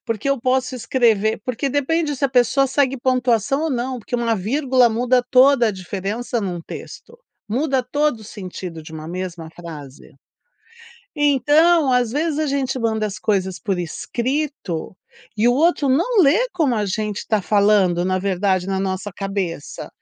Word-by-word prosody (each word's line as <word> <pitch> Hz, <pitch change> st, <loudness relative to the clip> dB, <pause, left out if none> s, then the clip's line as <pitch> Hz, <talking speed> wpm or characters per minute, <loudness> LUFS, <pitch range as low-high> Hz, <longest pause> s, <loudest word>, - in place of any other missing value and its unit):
Porque 230 Hz, +4 st, -1 dB
eu 275 Hz, -3 st, 0 dB
posso 255 Hz, 0 st, 0 dB
escrever 225 Hz, -3 st, +1 dB
porque 255 Hz, +2 st, -2 dB
depende 295 Hz, +2 st, 0 dB
se 275 Hz, -, -2 dB
a -, -, +3 dB
pessoa 255 Hz, +1 st, +3 dB
segue 270 Hz, -1 st, +1 dB
pontuação 255 Hz, +2 st, +1 dB
ou 320 Hz, -, -1 dB
não, 250 Hz, 0 st, -2 dB
porque 240 Hz, +3 st, -7 dB
uma 230 Hz, -2 st, +1 dB
vírgula 255 Hz, +4 st, +2 dB
muda 245 Hz, +2 st, +1 dB
toda 260 Hz, -1 st, +5 dB
a -, -, -1 dB
diferença 200 Hz, +5 st, -4 dB
num 180 Hz, -4 st, -3 dB
texto, 475 Hz, +1 st, -10 dB, 0.3 s
muda 265 Hz, +3 st, 0 dB
todo 290 Hz, -1 st, 0 dB
o -, -, -12 dB
sentido 185 Hz, -5 st, -8 dB
de 160 Hz, +1 st, -12 dB
uma 155 Hz, 0 st, -7 dB
mesma 175 Hz, -2 st, -5 dB
frase. 150 Hz, -6 st, -10 dB, 1.0 s
Então, 295 Hz, +1 st, +4 dB
às 245 Hz, -2 st, +2 dB
vezes, 310 Hz, +2 st, -1 dB
a 310 Hz, -, 0 dB
gente 270 Hz, -2 st, -1 dB
manda 220 Hz, -3 st, 0 dB
as 205 Hz, -, -7 dB
coisas 190 Hz, -3 st, -1 dB
por 195 Hz, -3 st, -2 dB
escrito, 235 Hz, -, -3 dB, 0.4 s
e 225 Hz, -, +3 dB
o 245 Hz, -, +5 dB
outro 300 Hz, 0 st, +2 dB
não 385 Hz, -, +3 dB
lê 365 Hz, -, +3 dB
como 300 Hz, -9 st, +1 dB
a 210 Hz, -1 st, 0 dB
gente 210 Hz, +1 st, -3 dB
tá 215 Hz, -2 st, +2 dB
falando, 200 Hz, -4 st, +3 dB
na 185 Hz, 0 st, 0 dB
verdade, 190 Hz, -1 st, 0 dB
na 190 Hz, 0 st, -1 dB
nossa 190 Hz, +1 st, -3 dB
cabeça. 195 Hz, -6 st, -4 dB
235 Hz, 165 wpm, -20 LUFS, 195-275 Hz, 1.0 s, toda